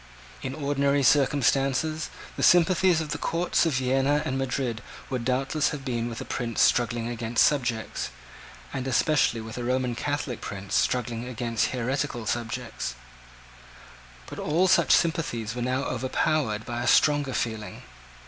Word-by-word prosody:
In 130 +1 -4
ordinary 140 -1 +1
circumstances, 140 +2 +2 0.3
the - - -5
sympathies 175 0 +4
of 155 - -5
the 150 - -3
courts 170 0 +1
of 160 - 0
Vienna 135 +3 +1
and 130 - -2
Madrid 130 -3 -2 0.3
would 125 -3 -2
doubtless 135 +4 +1
have 140 -3 -6
been 120 -2 -2
with 115 - -6
a - - -6
prince 120 -3 0
struggling 120 -1 +2
against 120 -1 +1
subjects, 120 -7 -1 0.6
and 130 - -3
especially 130 -3 +2
with 110 +2 -7
a - - -3
Roman 125 0 0
Catholic 140 -1 -3
prince 100 -1 -6
struggling 120 -1 0
against 115 -2 -1
heretical 130 -1 -2
subjects: 115 - -3 1.3
but - - -9
all 170 +5 +2
such - - +4
sympathies 135 -10 +1
were 125 - -4
now 130 +2 0
overpowered 130 -3 -1
by 120 0 -4
a - - -2
stronger 145 -3 +3
feeling. 110 -2 -4
130 Hz, 145 wpm, -26 LUFS, 120-145 Hz, 1.3 s, sympathies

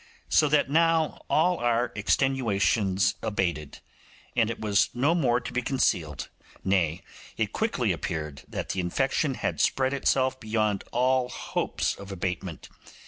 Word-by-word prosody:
So 150 - +4
that 150 0 +3
now 165 +1 +2
all 180 +3 +3
our 120 0 +1
extenuations 105 -5 +1
abated, 85 -8 -2 0.5
and 115 -2 +3
it 115 - -4
was 105 -1 +2
no 140 +7 +3
more 125 -8 +2
to 125 - -8
be 125 - 0
concealed; 85 - 0 0.4
nay, 90 -3 +1 0.3
it - - -1
quickly - - 0
appeared 75 -3 -4
that - - -5
the 95 - -2
infection 135 - 0
had - - -2
spread 130 0 +2
itself 130 -1 +1
beyond 110 -3 -1
all 125 +1 +2
hopes - - -2
of 100 0 -10
abatement. 90 -2 -4
115 Hz, 140 wpm, -27 LUFS, 95-135 Hz, 0.5 s, So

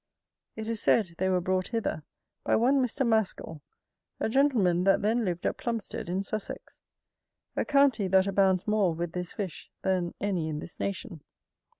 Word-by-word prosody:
It 220 0 -5
is 230 -1 -2
said, 205 -7 +3
they 190 +1 +1
were 185 -1 +2
brought 185 +1 0
hither 225 -9 -2 0.4
by - - +2
one 265 +4 +3
Mr. 255 +2 -1
Mascal, 215 -8 0 0.6
a - - 0
gentleman 220 -10 +3
that 195 +1 +3
then 225 +3 +2
lived 175 -3 -2
at - - 0
Plumsted 230 -7 -4
in 185 +2 -1
Sussex, 215 +1 -6 0.8
a - - +1
county 275 -8 +3
that 190 0 +4
abounds 190 -2 +2
more 205 -6 +2
with 170 0 -3
this 180 0 -4
fish 195 -5 -6
than 185 -2 0
any 185 -6 -1
in 150 - -3
this 165 - -8
nation. 185 -5 -4
195 Hz, 170 wpm, -28 LUFS, 180-225 Hz, 0.8 s, that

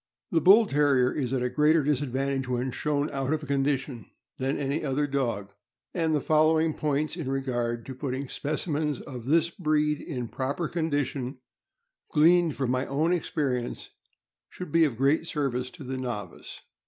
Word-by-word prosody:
The 165 - +3
Bull 210 +5 +7
Terrier 140 -6 +3
is 130 -4 -2
at 130 -2 0
a 125 - 0
greater 155 +1 +4
disadvantage 135 -1 -1
when 125 +1 -1
shown 145 +2 -1
out 135 0 -2
of 155 -1 -1
condition 135 -3 -1 0.3
than 135 +1 0
any 140 +2 -2
other 145 0 0
dog, 115 -8 -2 0.4
and 165 -3 +1
the - - +2
following 155 +2 +3
points 150 +1 -1
in 160 -7 -4
regard 120 -4 -2
to 135 - -6
putting 130 +1 -4
specimens 150 0 -2
of 125 -5 -8
this 165 +4 +3
breed 150 -3 0
in 125 -7 -4
proper 140 +7 -2
condition, 145 -5 -2 0.7
gleaned 165 0 +4
from 130 -3 -1
my 130 +1 0
own 155 +5 +1
experience, 140 -7 -2 0.6
should 180 -4 -8
be 165 +1 +5
of 130 -7 -2
great 145 +5 +2
service 130 -5 -1
to 165 -1 -11
the 130 0 -4
novice. 120 -5 -6
140 Hz, 160 wpm, -27 LUFS, 130-155 Hz, 0.7 s, Bull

